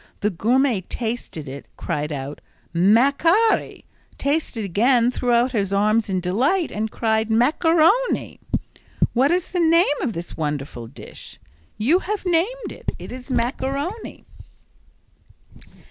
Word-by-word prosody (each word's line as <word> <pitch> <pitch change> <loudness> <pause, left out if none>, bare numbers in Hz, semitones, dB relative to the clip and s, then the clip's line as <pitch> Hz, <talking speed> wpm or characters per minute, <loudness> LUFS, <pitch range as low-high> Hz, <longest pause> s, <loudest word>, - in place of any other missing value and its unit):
The 210 - +1
gourmet 235 +4 +2
tasted 220 - -5
it, 135 +2 -8
cried 150 +1 -3
out 140 0 -5 0.3
"macari!" 280 - +3 0.3
Tasted 280 -6 -1
again, 235 +6 +3
threw 250 -1 -1
out 240 +2 +3
his 200 -5 -1
arms 210 +2 +2
in 185 -1 0
delight 260 - +1
and 220 +1 -2
cried 220 0 0
"macaroni!" 325 - +2 0.7
"What 260 +4 +3
is 355 0 0
the 360 - -1
name 335 +1 +5 0.2
of 235 - -1
this 170 0 -7
wonderful 145 -6 -4
dish?" 120 - -12 0.4
"You 270 - +3
have 410 +1 -4
named 370 +9 0
it. - - -5
It - - -9
is 255 +2 -9
macaroni." 275 - -3
240 Hz, 125 wpm, -22 LUFS, 200-320 Hz, 0.7 s, name